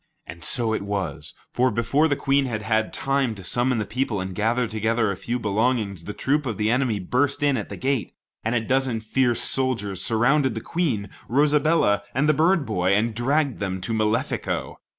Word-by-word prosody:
And 85 +1 -10
so 115 +1 +3
it - - -1
was; 100 -1 -4 0.2
for 130 +1 +3
before 115 +7 +2
the 145 - +1
Queen 140 0 +1
had 110 -3 -3
had 110 0 0
time 135 -4 0
to 95 - -10
summon 120 +6 +1
the 105 - -1
people 115 -2 -2
and 95 0 -4
gather 115 +5 +1
together 110 0 0
a - - -3
few 120 +7 -3
belongings, 105 -4 -1
the 105 - -5
troops 145 +4 0
of 115 - -3
the 105 +1 +1
enemy 125 -3 +1
burst 130 +10 0
in 145 -2 +3
at 110 - -4
the - - -7
gate, 135 -3 -1 0.3
and 110 +2 0
a 115 - +2
dozen 130 0 0
fierce 120 +2 0
soldiers 115 -8 -2
surrounded 120 +3 +2
the - - -2
Queen, 125 - -1 0.2
Rosabella, 145 -5 +3
and 140 +3 +2
the 155 - +5
bird 165 +1 +3
boy, 95 -3 +1
and 110 +2 +1
dragged 135 +3 0
them 95 -2 -2
to 115 - -2
Malefico. 110 +1 -1
115 Hz, 195 wpm, -24 LUFS, 105-135 Hz, 0.3 s, the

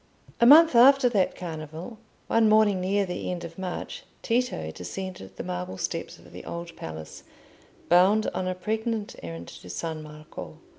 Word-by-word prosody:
A 235 - +6
month 320 +3 +9
after 255 +2 +7
that 200 -6 +1
Carnival, 165 +5 -7 0.3
one 225 -1 +3
morning 215 -3 +4
near 200 +2 +1
the 180 -1 -4
end 180 -1 -4
of 170 +1 -9
March, 190 - -5 0.2
Tito 235 - -1
descended 95 - -7
the - - -6
marble 90 +1 -5
steps - - -4
of - - -17
the - - -9
Old 170 0 -7
Palace, 80 -1 -8 0.7
bound 190 +5 +5
on 185 - -2
a 185 - -1
pregnant 220 +3 -3
errand 85 0 -7
to 90 - -12
San 155 - -4
Marco. 150 0 -10
185 Hz, 160 wpm, -26 LUFS, 155-220 Hz, 0.7 s, month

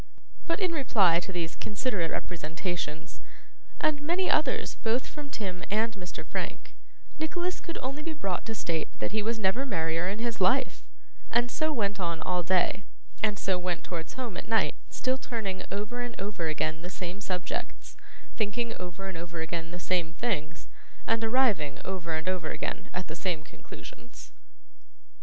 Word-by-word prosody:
But 335 - +2
in 370 -3 +3
reply 210 - +5
to 185 - -4
these 170 -2 -1
considerate 205 -5 0
representations, 165 -1 -3 0.6
and 295 -2 +3
many 350 +5 +3
others 290 -4 +3
both 230 +3 +2
from 295 -2 -7
Tim 190 -7 -3
and 220 +2 +3
Mr. 180 -5 -6
Frank, - - -3 0.5
Nicholas 350 +3 0
could 335 - -5
only 275 +3 -2
be 325 +1 -2
brought 195 - -1
to 225 - -2
state 165 -6 0
that - - -1
he 215 +1 +2
was 225 +2 +1
never 215 +5 +3
merrier 165 -7 +1
in 200 - -1
his 230 -2 -1
life; 250 +9 +4 0.5
and 240 +1 +3
so 310 +4 +2
went 205 -7 +1
on 170 -3 0
all 180 -1 +2
day, 185 +2 +3 0.4
and 210 -2 +3
so 190 -1 +2
went 180 -1 -1
towards 165 -2 -4
home 240 -7 -3
at - - -5
night, 225 -1 +4 0.2
still 260 0 +1
turning 200 -7 -2
over 210 +5 -2
and 245 -1 -4
over 195 -4 -1
again 155 +1 0
the 180 - -5
same 185 +1 -4
subjects, 180 -3 -3 0.4
thinking 230 +2 0
over 180 +2 -5
and 185 -4 -4
over 170 -1 -4
again 165 0 -2
the 175 +1 -5
same 175 -2 +1
things, 170 -9 -1 0.4
and 225 0 +2
arriving 220 - +3
over 170 -4 -1
and 160 +3 -2
over 180 -4 +1
again - - -3
at 180 0 -3
the 160 - -5
same 170 -4 -1
conclusions. - - -11
195 Hz, 170 wpm, -30 LUFS, 175-240 Hz, 0.6 s, reply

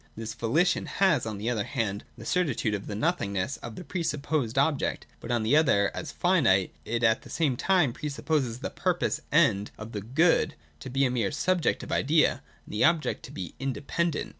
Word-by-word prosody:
— - - -34
This 115 0 -5
VoHtion 150 +11 +1
has, 175 - +2
on 105 -2 -4
the 110 +4 -2
one 105 -3 -1
hand, 110 -6 -3
the - - -10
certitude 145 -12 0
of 100 -1 -4
the 105 - -4
nothingness 105 - -1
of 115 -2 -8
the - - -7
pre 175 +3 -4
supposed 145 -6 -1
object; 140 +1 +1
but, - - -9
on 120 -2 +1
the 115 +6 +3
other, 135 -11 +4
as 155 - -5
finite, 130 - +2
it 115 +1 -2
at 115 +2 +3
the - - -14
same 150 -6 +1
time 175 -2 +2
pre 150 - -4
supposes 140 -4 -1
the - - -4
purposed - - 0
End 100 +1 +3
of 110 +1 -8
the 105 - -4
Good 150 - +2 0.2
to 130 - -8
be 135 +2 +2
a 125 - +1
mere 115 -6 0
subjective 185 -3 0
idea, 155 +2 +2 0.2
and - - -11
the 105 - +1
object 165 -1 +2
to - - -11
be 90 -4 -6
independent. 145 +4 -2
130 Hz, 205 wpm, -27 LUFS, 110-155 Hz, 0.2 s, other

